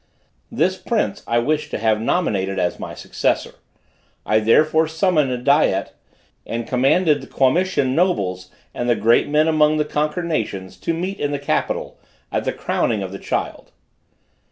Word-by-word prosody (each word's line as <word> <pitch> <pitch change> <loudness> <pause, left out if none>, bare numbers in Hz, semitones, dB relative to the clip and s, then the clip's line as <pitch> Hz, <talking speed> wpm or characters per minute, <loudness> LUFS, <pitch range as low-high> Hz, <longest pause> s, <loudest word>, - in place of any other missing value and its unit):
This - - +1
prince - - -1
I 115 - +1
wished 150 +5 0
to - - -3
have 110 -1 +1
nominated 100 - 0
as 90 -1 -1
my - - -7
successor. - - -1 0.7
I 110 - +3
therefore 155 +8 +3
summoned 160 -3 +1
a 125 - -1
Diet, 130 -6 +2 0.5
and 115 0 -4
commanded 140 +5 +2
the 135 - -11
Quamitian 140 0 +1
nobles 95 - 0 0.2
and 120 - -2
the 120 - +4
great 115 +5 +3
men 150 +2 +3
among 155 -1 +3
the 150 - +1
conquered 150 +4 -2
nations, 100 - -3
to 165 - -2
meet 185 +4 -4
in 145 - -1
the 145 - -1
capital, 140 - -2 0.3
at - - -1
the - - +1
crowning 110 -4 -1
of 95 - -6
the 100 - -7
child. - - -4
140 Hz, 160 wpm, -20 LUFS, 110-155 Hz, 0.7 s, the